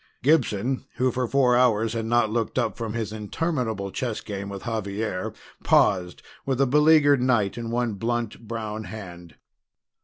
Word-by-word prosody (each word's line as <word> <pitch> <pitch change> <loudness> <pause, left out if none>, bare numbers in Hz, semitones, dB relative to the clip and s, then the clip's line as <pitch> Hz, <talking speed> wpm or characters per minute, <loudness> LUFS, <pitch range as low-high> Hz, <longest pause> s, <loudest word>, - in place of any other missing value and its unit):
Gibson, 130 -4 +1
who 130 0 +1
for 125 +1 -1
four 125 -1 +3
hours 115 -3 +3
had 115 -1 -3
not 120 -2 +2
looked 115 0 -2
up 115 -5 0
from 115 -2 -4
his 110 -3 -3
interminable 110 - -2
chess 120 -1 -3
game 100 -1 -6
with 100 -1 -7
Xavier, 105 -3 -3 0.3
paused 90 -3 +2 0.2
with 135 -2 -1
a 135 - +5
beleaguered 150 0 +5
knight 120 -6 +2
in 115 -1 -5
one 120 -1 0
blunt 115 +1 -3
brown 110 -1 -4
hand. 90 -4 -9
115 Hz, 155 wpm, -25 LUFS, 105-125 Hz, 0.3 s, a